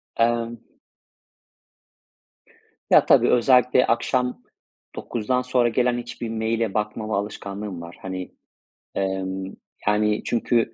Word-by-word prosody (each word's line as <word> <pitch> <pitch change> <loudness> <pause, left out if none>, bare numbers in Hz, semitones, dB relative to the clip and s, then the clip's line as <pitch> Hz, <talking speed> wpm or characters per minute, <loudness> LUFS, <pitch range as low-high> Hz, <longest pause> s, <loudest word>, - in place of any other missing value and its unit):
Emm 115 0 +1 2.3
Ya - - +7
tabii, - - +5
özellikle 125 +1 +4
akşam 125 +2 0 0.5
21.00'den 120 +2 -1
sonra 125 -1 +2
gelen 125 +1 +1
hiçbir 120 -1 -6
mail'e 110 -1 -1
bakmama 105 0 -2
alışkanlığım 100 -2 -5
var. 85 +1 -10
Hani, 95 -1 -5 0.6
emm, 95 0 -2 0.3
yani 105 0 +2
çünkü, 115 -1 +1
115 Hz, 95 wpm, -23 LUFS, 100-120 Hz, 2.3 s, Ya